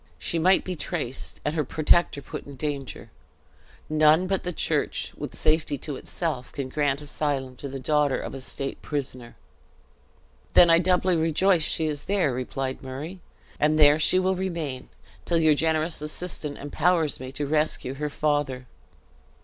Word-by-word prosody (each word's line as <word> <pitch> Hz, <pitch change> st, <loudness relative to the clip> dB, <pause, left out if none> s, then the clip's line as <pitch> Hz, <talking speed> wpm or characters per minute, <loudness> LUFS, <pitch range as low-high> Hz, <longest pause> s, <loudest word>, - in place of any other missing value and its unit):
She 170 Hz, -, -2 dB
might 185 Hz, +3 st, +4 dB
be 185 Hz, -, -4 dB
traced, 145 Hz, -4 st, -4 dB
and 150 Hz, -, 0 dB
her 155 Hz, -2 st, 0 dB
protector 155 Hz, 0 st, +2 dB
put -, -, -8 dB
in 140 Hz, -, -9 dB
danger; 140 Hz, -1 st, -5 dB, 0.8 s
none 155 Hz, +3 st, +4 dB
but 190 Hz, 0 st, 0 dB
the 180 Hz, -, -3 dB
church, -, -, -1 dB
with -, -, -6 dB
safety 155 Hz, -2 st, +1 dB
to 145 Hz, +2 st, -5 dB
itself, 140 Hz, -3 st, -3 dB
can 135 Hz, -2 st, -5 dB
grant 145 Hz, 0 st, 0 dB
asylum 140 Hz, -3 st, -2 dB
to 140 Hz, -, -6 dB
the 135 Hz, 0 st, -6 dB
daughter 145 Hz, 0 st, +2 dB
of -, -, -6 dB
a 135 Hz, -, -6 dB
state 135 Hz, +1 st, -4 dB
prisoner." 130 Hz, -5 st, -5 dB, 1.2 s
"Then 170 Hz, -1 st, +8 dB
I 165 Hz, -, +6 dB
doubly 180 Hz, 0 st, +2 dB
rejoice 165 Hz, +3 st, +3 dB
she 160 Hz, +1 st, +1 dB
is 150 Hz, -2 st, -2 dB
there," 190 Hz, -9 st, +1 dB
replied 130 Hz, +1 st, -4 dB
Murray, 145 Hz, +8 st, -7 dB, 0.4 s
"and 155 Hz, +1 st, +3 dB
there 150 Hz, 0 st, +6 dB
she 155 Hz, -, +4 dB
will 185 Hz, +1 st, +2 dB
remain, 165 Hz, -8 st, -4 dB, 0.3 s
till 170 Hz, -, +1 dB
your 160 Hz, -2 st, +5 dB
generous 160 Hz, +1 st, 0 dB
assistance 150 Hz, -1 st, -3 dB
empowers 160 Hz, +1 st, +1 dB
me 130 Hz, 0 st, -7 dB
to 145 Hz, -, -2 dB
rescue 150 Hz, -3 st, 0 dB
her 150 Hz, +2 st, -3 dB
father." 145 Hz, -4 st, -1 dB
150 Hz, 160 wpm, -25 LUFS, 140-165 Hz, 1.2 s, Then